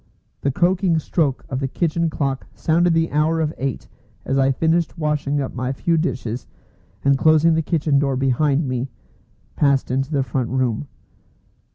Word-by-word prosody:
The 140 - +1
croaking 175 +3 +2
stroke 150 -3 -1
of 130 -4 -3
the 135 - -1
kitchen 170 +3 0
clock 135 -3 -2
sounded 170 +1 +2
the 165 0 +1
hour 155 +2 +1
of 155 -1 0
eight 135 -2 -3 0.4
as 135 - -1
I 135 0 +3
finished 165 +5 0
washing 150 -2 0
up 135 - -3
my 130 +1 -2
few 165 +5 0
dishes, 130 -7 -2 0.6
and 140 0 +5
closing 155 +1 +5
the 160 - +2
kitchen 155 -3 +1
door 140 -2 0
behind 135 +3 +1
me, 130 +1 -2 0.7
passed 140 -3 +2
into 135 +1 0
the 140 -4 +1
front 125 -1 -2
room. 130 0 -1
145 Hz, 165 wpm, -21 LUFS, 135-160 Hz, 0.7 s, and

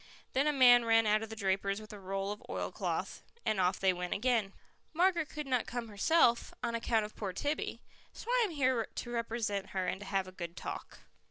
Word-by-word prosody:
Then 275 +3 +2
a - - +4
man 245 -4 +7
ran 225 -1 +4
out 215 0 +3
of 225 - -5
the 220 - -6
draper's 195 0 0
with 215 0 -11
a 205 - -8
roll 195 +1 -3
of 210 - -6
oilcloth, - - -3 0.2
and 215 - +1
off 180 0 +2
they 190 -1 +3
went 180 0 -3
again. 225 -2 +1 0.4
"Margaret 340 -2 +2
could 300 -1 -5
not 255 -3 0
come 240 -2 -4
herself, 235 +3 +3
on 235 -1 -1
account 230 -1 +1
of 210 - -10
poor 195 -4 -4
Tibby, 290 +9 -3 0.3
so - - -11
I - - +3
am - - -3
here 260 -7 +1
to 240 - -5
represent 225 -4 -2
her 185 - +1
and 190 - -2
to 205 - -8
have 195 -1 0
a - - -9
good 170 -2 -7
talk." - - -7
220 Hz, 220 wpm, -33 LUFS, 195-255 Hz, 0.4 s, man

